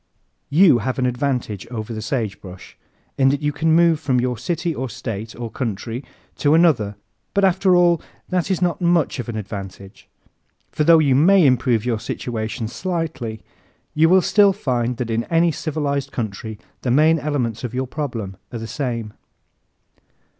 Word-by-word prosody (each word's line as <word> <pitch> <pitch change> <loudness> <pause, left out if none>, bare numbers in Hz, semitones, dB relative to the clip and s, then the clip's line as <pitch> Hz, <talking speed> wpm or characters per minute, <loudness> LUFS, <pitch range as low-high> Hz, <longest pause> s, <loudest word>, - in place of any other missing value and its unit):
You 155 -4 +5
have 130 +4 -2
an 130 - +1
advantage 125 -5 -2
over 115 -1 -5
the 110 - -5
sagebrush 105 -6 -5 0.4
in 135 0 +5
that 140 +2 -1
you 150 - +1
can 160 +2 0
move 170 -2 +4
from 130 -5 +1
your 125 0 0
city 170 +5 -2
or 130 -3 -4
state 115 -2 -6
or 115 -2 -6
country 115 +1 -4 0.3
to 145 +1 +3
another, 135 -12 +3 0.4
but 200 -1 +4
after 190 0 +3
all 175 -2 +4 0.3
that 180 0 0
is 185 -2 0
not 175 0 0
much 170 -5 +2
of 120 - -5
an 110 - -4
advantage. 100 -2 -8 0.6
For 150 - 0
though 165 +2 +7
you 145 -4 +3
may 175 +6 +5
improve 125 -3 +2
your 115 -3 0
situation 110 0 -4
slightly 155 - -4 0.5
you 160 +2 +4
will 185 0 +5
still 200 -2 +4
find 125 - -1
that 115 -2 -3
in 115 +1 -1
any 165 0 +2
civilized 140 -3 -2
country 110 -1 -5 0.2
the 125 - -2
main 155 +5 +4
elements 125 -7 -2
of 125 0 -4
your 130 +1 -1
problem 120 - -5
are 120 - -5
the 115 - -6
same. 115 -4 -4
130 Hz, 170 wpm, -21 LUFS, 115-160 Hz, 0.6 s, though